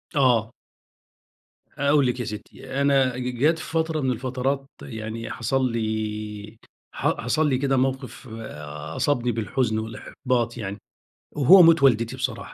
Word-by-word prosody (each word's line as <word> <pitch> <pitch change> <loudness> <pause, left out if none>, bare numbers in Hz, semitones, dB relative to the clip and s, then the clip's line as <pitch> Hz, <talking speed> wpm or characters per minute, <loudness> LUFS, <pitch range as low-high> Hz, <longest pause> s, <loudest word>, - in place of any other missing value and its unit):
آه. 120 -5 +3 1.3
هاقول 140 0 +3
لِك 125 +1 -1
يا 120 - -2
ستّي، 130 +5 -6
أنا 135 -3 +3
ج 125 -1 -4
جات 160 +5 +3
فترة 160 0 -1
من 130 -1 +1
الفترات 130 +3 -2
يعني 110 -1 -6
حصل 130 +2 0
لي، 110 -1 -4 0.4
ح - - -1
حصل 150 +6 +1
لي 130 - +2
كده 135 0 +1
موقِف 130 0 -2 0.7
أصابني 125 -4 +1
بالحزن 110 0 -1
والإحباط 120 +2 -2
يعني، 100 -3 -5 0.6
وهو 170 +7 +8
موت 165 -3 +6
والدتي 115 -2 +3
بصراحة. 130 -3 -4
125 Hz, 130 wpm, -24 LUFS, 115-135 Hz, 1.3 s, وهو